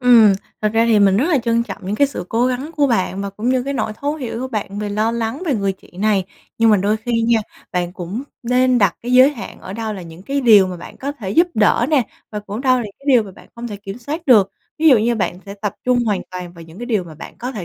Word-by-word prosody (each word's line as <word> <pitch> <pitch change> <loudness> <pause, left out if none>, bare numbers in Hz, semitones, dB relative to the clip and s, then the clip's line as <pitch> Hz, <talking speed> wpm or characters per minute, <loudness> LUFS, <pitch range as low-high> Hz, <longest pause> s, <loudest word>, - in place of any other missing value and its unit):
Ừm, 235 -5 +7 0.3
thật 215 - +3
ra 225 +1 +3
thì 220 -2 +4
mình 195 -1 +4
rất 255 - +2
là 300 -6 +3
trân 235 -1 +1
trọng 210 -4 -7
những 205 - -1
cái 285 - +4
sự 175 -10 -6
cố 235 +2 +1
gắng 255 +5 -2
của 290 -1 +4
bạn 195 -5 0
và 200 - -4
cũng 210 +5 -3
như 255 -1 +2
cái 280 +1 -3
nỗi 220 -4 -1
thấu 290 +2 -1
hiểu 245 -5 -5
của 260 - -3
bạn 205 -3 -4
về 210 -1 -3
lo 215 +2 0
lắng 235 +7 -3
về 285 - +1
người 200 -2 0
chị 190 - -20
này. 205 -3 +2 0.3
Nhưng 225 -1 +5
mà 210 - +6
đôi 205 +3 +1
khi 230 +1 -1
nha, 230 0 +3 0.3
bạn 175 -1 -1
cũng 190 +7 -5 0.2
nên 250 +1 +3
đặt 195 -4 +2
cái 245 +1 -3
giới 260 +3 +7
hạn 260 - -9
ở 190 - -8
đâu 220 0 -3
là 190 -3 -7
những 165 +2 -12
cái 280 +5 -1
điều 210 -6 +6
mà 180 -1 -5
bạn 170 - -11
có 280 +2 -4
thể 205 -9 -6
giúp 335 - +4
đỡ 225 +2 +3
nè 275 -7 +2 0.2
và 210 -1 -4
cũng 210 +3 -6
đâu 255 -1 +3
là 235 - -3
cái 275 - -19
điều 245 -4 +6
mà 200 - -10
bạn - - -17
hông 240 0 -5
thể 205 - -6
kiểm 200 +2 -8
soát 305 +7 -6
được. 210 -7 +5 0.3
Ví 320 0 +5
dụ 255 -6 +7
như 235 +2 +1
bạn 185 -4 -2
sẽ 200 - -7
tập 205 0 -4
trung 250 -1 +3
hoàn 205 -4 0
toàn 180 -1 -7
vào 170 -1 -12
những 165 +4 -14
cái 240 - -6
điều 210 -7 0
mà 160 -2 -11
bạn 155 - -10
có 250 +2 -4
thể 200 -7 -5
225 Hz, 295 wpm, -19 LUFS, 200-250 Hz, 0.3 s, Ừm